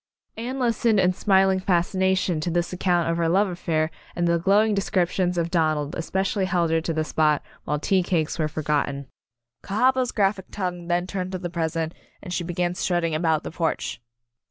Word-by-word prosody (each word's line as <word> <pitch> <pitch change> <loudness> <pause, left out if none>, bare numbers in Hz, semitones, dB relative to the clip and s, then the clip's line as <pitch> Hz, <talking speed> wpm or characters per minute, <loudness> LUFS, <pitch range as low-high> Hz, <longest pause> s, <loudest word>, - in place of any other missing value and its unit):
Anne 245 +4 -4
listened 230 -3 +2
in 185 -1 +3
smiling 190 0 +3
fascination 185 -1 +1
to 155 - -2
this 175 +1 -1
account 175 -2 +1
of 165 0 0
her 165 -1 +1
love 195 +4 +3
affai'r 165 -3 -1 0.2
and 175 0 +1
the 170 0 +2
glowing 205 +5 +3
descriptions 185 -2 0
of 170 0 -1
Donald 155 -4 +1
espe 175 +3 -1
cially 195 0 0
held 175 -3 +1
her 165 0 +2
to 165 - -2
the 155 -1 0
spot 155 -1 +1 0.2
while 150 - 0
tea 185 +5 +2
cakes 170 -2 -1
were 155 - +2
forgotten. 145 -2 -1 0.6
Cahaba's 255 +4 +1
graphic 195 -2 +1
tongue 180 -3 -4
then 175 0 +1
turned 185 0 -4
to - - -1
the 175 -1 -5
present, 165 -1 -2 0.3
and 180 - -7
she 175 - -1
began 175 +1 -1
strutting 175 -3 0
about 160 -1 +1
the - - -6
porch. 165 -7 -2
175 Hz, 185 wpm, -24 LUFS, 165-190 Hz, 0.6 s, in